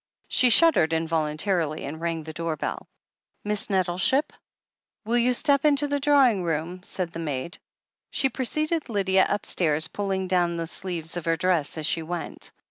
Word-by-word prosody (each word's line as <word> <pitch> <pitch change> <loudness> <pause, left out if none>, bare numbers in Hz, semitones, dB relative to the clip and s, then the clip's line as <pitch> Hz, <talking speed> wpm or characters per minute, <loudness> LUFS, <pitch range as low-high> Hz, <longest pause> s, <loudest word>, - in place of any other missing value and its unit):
She 250 - +4
shuddered 240 - +5
involuntarily, 160 0 -1
and 160 +3 -7
rang 165 -1 -2
the 160 0 -8
door 165 0 -3
bell. - - -4 0.6
"MissNettleship?" 200 - +1 0.7
"Will 235 +2 +2
you 245 +1 +3
step 280 +2 +3
up - - -4
into 290 -1 +3
the 285 0 -1
drawing 270 -9 +3
room?" 165 +2 -3
said 180 -2 -4
the 165 - -7
maid. 150 0 -4 0.5
She 270 - +1
preceded 305 +4 -1
Lydia 190 -3 +2
upstairs, 165 -5 0
pulling 195 -2 -2
down 175 -2 +1
the 165 - -2
sleeves 170 -1 -3
of 175 - -5
her 165 0 +1
dress 175 -5 0
as 155 - -3
she 165 - +1
went. 170 +1 -6
180 Hz, 160 wpm, -25 LUFS, 165-235 Hz, 0.7 s, shuddered